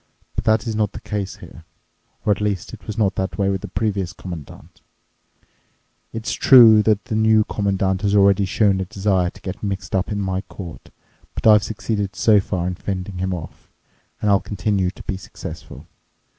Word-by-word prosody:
But - - -3
that 110 0 +3
is 110 -2 -2
not 105 -2 0
the - - -7
case 100 -4 -4
here, - - -13 0.6
or 105 - +3
at 100 - 0
least 100 -3 -2
it 105 -6 -11
was 110 - -5
not 100 -3 +2
that 95 0 -2
way 100 -1 +1
with 95 -1 -1
the - - -6
previous 100 -4 -2
Commandant. 85 -5 -10 1.3
It's 115 0 -4
true 115 -5 +8
the 105 0 +3
New 110 0 +4
Commandant 95 -2 -1
has 100 0 +1
already 100 0 +4
shown 95 0 +2
a - - -2
desire 95 -2 0
to - - -16
get 95 0 -6
mixed 100 -2 -4
up 95 +2 0
in 105 - -2
my 95 -1 -1
court, 90 -4 -10 0.5
but - - -5
I've 105 -2 +7
succeeded 100 -1 -3
so 110 -2 +4
far 95 -2 -2
in 90 - -1
fending 95 0 -5
him 95 +1 -1
off. 85 -3 -7 0.5
And 105 - +3
I'll 100 - +4
continue 100 -2 -1
to 95 - -11
be 95 - -3
successful. 95 - -10
100 Hz, 185 wpm, -21 LUFS, 95-105 Hz, 1.3 s, true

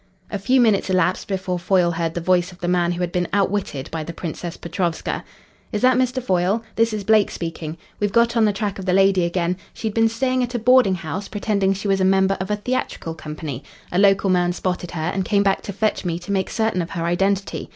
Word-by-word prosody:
A 205 - -2
few 255 +7 +3
minutes 215 -5 +3
elapsed 185 0 +1
before 185 -2 -2
Foyle 175 0 +2
heard 165 -1 -2
the 170 - -2
voice 180 +1 +2
of 180 - -14
the 175 - -3
man 175 -1 +2
who 175 - -4
had 175 -1 -1
been 175 -1 0
outwitted 195 -8 0
by 160 -1 -3
the 170 - -6
Princess 170 +1 -6
Petrovska. 170 -1 -2 0.5
"Is 210 -1 -2
that 255 0 +5
Mr. 255 0 0
Foyle? 190 +1 +1
This 230 0 +2
is 210 -2 -3
Blake 215 0 +4
speaking. 165 -1 -5 0.2
We've 205 -1 0
got 235 +2 +3
on 225 -2 +4
the 210 - +3
track 200 -1 -3
of 190 - -6
the 180 - +2
lady 195 -1 +4
again. 175 +1 -1 0.2
She'd 220 -2 -3
been 225 +1 +3
staying 255 +3 0
at 245 0 -2
a - - +2
boarding 245 -4 +4
house 175 +3 -5
pretending 200 -2 0
she 200 +2 -5
was 195 -1 +2
a 190 +1 +4
member 190 +1 +2
of 190 +1 -4
a 210 - +1
theatrical 210 -6 -3
company. 150 -4 -6 0.3
A 180 - +1
local 195 -1 +4
man 175 -1 +2
spotted 180 -1 -3
her 165 0 -2
and 190 - 0
came 200 +1 +2
back 195 -1 +1
to - - -6
fetch 210 +2 -1
me 170 -2 -1
to 175 +3 -7
make 190 -1 0
certain 220 -5 0
of 170 - -5
her 165 -1 -3
identity. 195 +3 0
190 Hz, 235 wpm, -22 LUFS, 175-210 Hz, 0.5 s, that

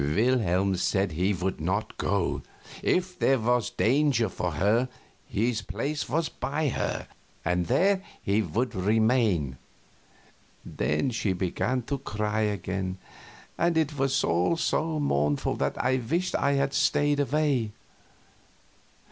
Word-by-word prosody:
Wilhelm 95 - +2
said 95 +1 +1
he 90 +6 +1
would 95 -3 -2
not 95 +6 -1
go; 100 -3 0 0.4
if 180 0 0
there 135 - +4
was 120 0 +1
danger 130 -3 +2
for 90 -2 -3
her, 110 - +2 0.4
his 115 +1 0
place 125 +11 -3
was 165 +1 +1
by 150 +1 -2
her, - - -2 0.4
and 90 0 +1
there 190 +9 +3 0.2
he 100 +2 +1
would 115 +8 -1
remain. 105 - +2 1.1
Then 75 - -1
she 110 -4 0
began 100 +8 -1
to 140 +4 -3
cry 105 0 -2
again, 95 -2 -2 0.6
and 170 0 +2
it 155 -2 +1
was 135 -1 +1
all 90 - +2
so 160 -1 0
mournful 75 - +1
that - - -1
I 130 +1 +1
wished 165 +10 -1
I 140 - +2
had 140 0 +1
stayed 145 0 +2
away. 140 -6 +1
115 Hz, 130 wpm, -27 LUFS, 95-140 Hz, 1.1 s, there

